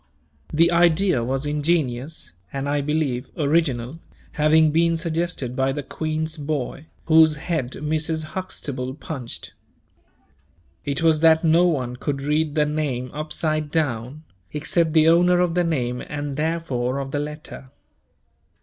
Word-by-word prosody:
The 165 +3 +4
idea 170 -4 +3
was 135 +4 -1
ingenious, 145 - -1 0.2
and, 140 0 -3
I 145 0 +1
believe, 140 -4 -1
original 145 -3 0 0.3
having 155 +1 +4
been 165 +1 +2
suggested 165 -6 -2
by 135 0 +1
the 145 +1 -4
Queen's 155 +2 -3
boy, 145 0 -4 0.2
whose 160 -1 +6
head 150 -5 -3
Mrs. 155 +1 -1
Huxtable 135 -8 -4
punched. 135 -6 -7 1.3
It 140 +2 -1
was 160 -2 +4
that 160 0 +5
no 165 +2 +5
one 125 -7 -1
could 140 +1 -3
read 150 +1 0
the 150 -1 +3
name 145 -5 -2
upside 155 0 -2
down, 145 -2 -2 0.3
except 160 +2 0
the 160 -1 +5
owner 175 +2 +5
of 180 -2 +2
the 180 0 +2
name 125 -7 -1
and 145 -1 -4
therefore 150 -5 -1
of 135 -1 -4
the 145 - -1
letter. 150 -2 -7
150 Hz, 135 wpm, -23 LUFS, 135-160 Hz, 1.3 s, whose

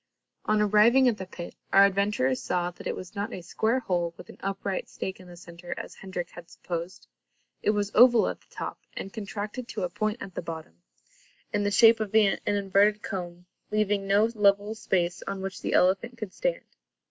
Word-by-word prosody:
On 215 0 +2
arriving 225 +6 +5
at 230 -4 +1
the 190 - -6
pit, 175 -2 -8 0.2
our 195 +1 +8
adventurers 195 -10 +1
saw 175 +6 -1
that 175 - -9
it - - -2
was 185 - -9
not 205 +2 -3
a 180 - -7
square 225 +8 0
hole 175 -5 -1
with - - -12
an - - -12
upright 195 -1 -3
stake 190 0 -5
in 185 - -13
the 175 -1 -12
centre, 170 0 -8
as - - -7
Hendrik 185 -2 -6
had 170 -1 -12
supposed. 175 +2 -6 0.6
It - - +1
was 205 -1 +1
oval 240 0 +7
at - - -4
the - - -28
top - - -6 0.2
and 195 - -6
contracted 215 +2 -5
to 210 -4 -4
a 180 - -1
point 215 +5 -2
at 190 - -8
the - - -4
bottom, 160 - -8 0.7
in 205 - +1
the 205 - +2
shape 225 +3 +6
of 215 -1 -3
an 210 -3 +4
inverted 205 +1 +2
cone, 175 -3 -5 0.2
leaving 205 -2 0
no 200 +2 +4
level 205 0 +3
space 175 -5 -1
on 195 0 -3
which 190 -1 -5
the - - -2
elephant 195 +7 +2
could 215 -5 -6
stand. - - -2
200 Hz, 200 wpm, -27 LUFS, 180-215 Hz, 0.7 s, our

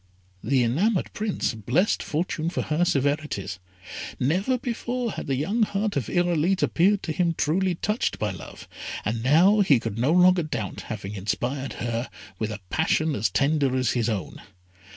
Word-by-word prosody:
The 135 -3 +2
enamoured 175 - +1
Prince 210 - -1
blessed 120 - +1
Fortune 160 +1 -2
for 175 - -2
her 155 +3 +1
severities; 140 - -1 0.6
never 190 - +1
before 245 0 -3
had - - -6
the 135 - +1
young 195 - -1
heart 205 0 0
of 135 -6 -1
Irolite 175 +1 +1
appeared 195 +4 +2
to 165 - -3
him 170 +1 +1
truly 180 +3 +1
touched 210 +7 -1
by 105 -2 -1
love, 90 - -10 0.4
and 115 +2 -1
now 170 - +5
he 150 - +5
could 115 -1 -4
no 130 +6 +2
longer 180 +1 +5
doubt 115 - -4
having 100 -2 -5
inspired 125 +7 -2
her 120 +1 -3 0.3
with 110 - -1
a 105 -1 -6
passion 160 -1 +1
as 110 -3 0
tender 140 -2 +1
as 130 -3 +1
his 120 -1 0
own. 105 -4 -4
155 Hz, 165 wpm, -25 LUFS, 120-185 Hz, 0.6 s, now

